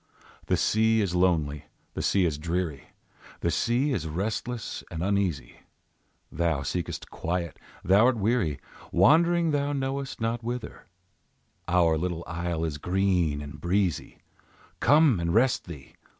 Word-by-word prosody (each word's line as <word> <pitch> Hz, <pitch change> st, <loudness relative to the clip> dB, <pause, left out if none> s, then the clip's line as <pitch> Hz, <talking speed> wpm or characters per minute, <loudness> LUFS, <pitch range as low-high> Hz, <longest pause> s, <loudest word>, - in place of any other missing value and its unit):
The -, -, +2 dB
sea 110 Hz, +1 st, +2 dB
is 100 Hz, -4 st, 0 dB
lonely, 80 Hz, -5 st, +1 dB, 0.3 s
the -, -, -4 dB
sea 95 Hz, -2 st, +2 dB
is 75 Hz, -3 st, -1 dB
dreary, 85 Hz, -3 st, -3 dB, 0.5 s
The 85 Hz, -, +1 dB
sea 125 Hz, -, +1 dB
is 80 Hz, -9 st, -2 dB
restless 110 Hz, +7 st, -4 dB
and 85 Hz, -1 st, -4 dB
uneasy; 95 Hz, -10 st, -1 dB, 0.7 s
Thou 80 Hz, -4 st, 0 dB
seekest 85 Hz, +6 st, -4 dB
quiet, 85 Hz, 0 st, -3 dB, 0.2 s
thou 100 Hz, +5 st, +5 dB
art 130 Hz, -2 st, +2 dB
weary, 105 Hz, -, 0 dB, 0.3 s
Wandering 170 Hz, +1 st, +4 dB
thou 145 Hz, 0 st, 0 dB
knowest 135 Hz, 0 st, -3 dB
not 115 Hz, +1 st, -1 dB
whither; 120 Hz, +1 st, -6 dB, 0.8 s
Our 85 Hz, -3 st, +3 dB
little 85 Hz, -1 st, -3 dB
isle 85 Hz, -1 st, -3 dB
is 75 Hz, -2 st, -4 dB
green 90 Hz, -4 st, +1 dB
and 75 Hz, +1 st, -10 dB
breezy, 90 Hz, 0 st, -1 dB, 0.6 s
Come 145 Hz, -, +5 dB
and 85 Hz, 0 st, -1 dB
rest 125 Hz, +2 st, +3 dB
thee! 75 Hz, -6 st, -11 dB
90 Hz, 135 wpm, -27 LUFS, 80-115 Hz, 0.8 s, thou